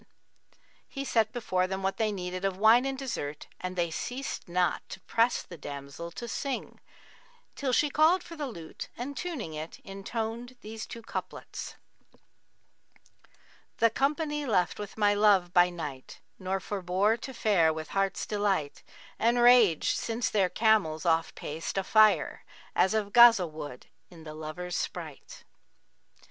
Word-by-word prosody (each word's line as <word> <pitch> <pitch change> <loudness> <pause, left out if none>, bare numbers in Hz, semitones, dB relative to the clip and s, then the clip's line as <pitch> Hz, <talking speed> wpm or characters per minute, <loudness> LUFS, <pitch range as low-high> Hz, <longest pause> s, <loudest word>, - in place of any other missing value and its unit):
[FN#43] - - -26 0.8
He 275 -1 -5
set 225 -4 +2
before 185 -6 0
them 190 +1 -4
what 195 0 -1
they 220 -2 +1
needed 185 -1 -5
of 195 -1 -1
wine 225 +5 +6
and 270 0 -3
dessert, 155 - -4
and 185 0 -5
they 170 -2 0
ceased 250 - -5
not 180 0 +1
to - - -7
press 230 +5 +1
the 170 -3 -12
damsel 140 +3 -7
to 235 +7 -7
sing, 270 +3 -4 0.8
till 275 -2 -1
she 290 +4 +2
called 330 +5 +4
for 335 - -10
the 295 -3 -3
lute 170 -10 -8
and 270 +4 -5
tuning 285 - -4
it, 155 +1 -6
intoned 225 +5 -5
these 220 +1 -7
two 230 - -9
couplets, - - -6 2.0
'The 230 -1 +4
company 295 +1 0
left 180 -6 +1
with 205 0 -7
my 205 -1 +4
love 200 -4 +3
by 175 0 +6
night, 150 -7 -7
* - - -43
Nor 190 0 -2
forbore 190 +2 0
to 265 - -7
fare 195 -10 +3
with 155 -1 -6
heart's 195 -1 0
delight: 200 -8 -1 0.4
And 235 +2 +3
raged, 240 -9 +5
since 230 0 -2
their 195 -4 +2
camels 205 -9 +2
off 165 -1 +1
paced, 160 +5 -5
a 195 - +1
fire 215 +1 +4 0.2
* - - -24
As 190 +4 +3
of 205 -2 -1
Ghazб[FN#44] 230 -8 +7
wood 145 -5 -8 0.2
in 165 -3 -13
the 155 -1 -8
lover's 160 +3 -6
sprite.' 160 -5 -6
200 Hz, 155 wpm, -29 LUFS, 175-235 Hz, 2.0 s, Ghazб[FN#44